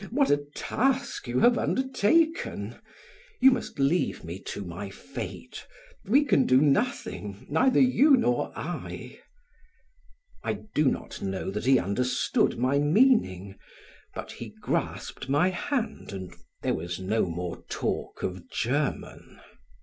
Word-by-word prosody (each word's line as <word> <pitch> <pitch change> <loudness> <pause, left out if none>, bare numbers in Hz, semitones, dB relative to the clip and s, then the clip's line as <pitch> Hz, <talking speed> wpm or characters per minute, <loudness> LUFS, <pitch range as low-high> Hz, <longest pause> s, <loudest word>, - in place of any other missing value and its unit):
What 275 +3 +2
a 145 0 +2
task 265 - -1
you 120 +1 0
have 240 0 +5
undertaken! 265 - +1 0.6
You 265 +1 +8
must 250 -2 -3
leave 140 - +1
me 85 +2 -6
to 100 - -4
my 90 +3 -6
fate; - - -8 0.4
we 275 +9 +4
can 145 - +3
do 130 0 +6
nothing, 140 - 0
neither 255 - +4
you 265 +2 +6
nor 245 0 +1
I." - - -6 1.2
I - - 0 0.2
do 150 - +2
not 130 - -1
know 95 0 -3
that 105 +4 -4
he 135 0 +6
understood 125 +6 +1
my 130 +3 +2
meaning, 145 - +2 0.6
but - - -6
he - - -9
grasped - - -3
my 150 +7 +3
hand 230 - -3
and 95 -2 -7 0.3
there - - +1
was 85 +2 -4
no 95 +2 0
more 85 0 -5
talk - - -3
of 90 -1 -4
German. 140 +5 -2
140 Hz, 130 wpm, -27 LUFS, -, 1.2 s, You